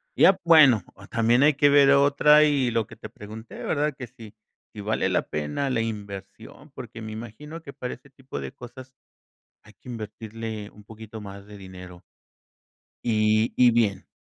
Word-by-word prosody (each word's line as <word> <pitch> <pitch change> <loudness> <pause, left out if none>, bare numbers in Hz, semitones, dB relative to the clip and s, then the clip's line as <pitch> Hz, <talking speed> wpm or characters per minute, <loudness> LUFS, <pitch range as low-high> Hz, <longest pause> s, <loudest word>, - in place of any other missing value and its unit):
Ya 190 0 +5
Bueno, 150 - +6
o 100 - -14
también 120 +3 +2
hay 150 0 +5
que 145 0 +4
ver 140 -1 +6
otra 145 +2 +5
y 140 -5 +2
lo 115 -2 -1
que - - -13
te - - -10
pregunté, 110 +2 -11
¿verdad?, 150 0 0
que 125 - -7
si, 110 -1 -14 0.4
si 105 - -8
vale 110 +2 -1
la - - +1
pena 75 - -3
la 115 -3 0
inversión, 105 +5 -8
porque 120 -3 -10
me 110 - -7
imagino 120 +9 -9
que 140 - -11
para 125 -2 -5
ese 135 +2 -21
tipo 135 0 -9
de - - -6
cosas 130 0 -12 0.7
hay 105 - -18
que 125 - -15
invertirle 110 -1 -7
un 105 - -17
poquito 110 +1 -11
más 100 0 -10
de 105 - -11
dinero. 90 -2 -12 1.0
Y 110 -1 +2
y 125 -1 +5
bien. 110 -5 0
115 Hz, 175 wpm, -25 LUFS, 105-140 Hz, 1.0 s, Bueno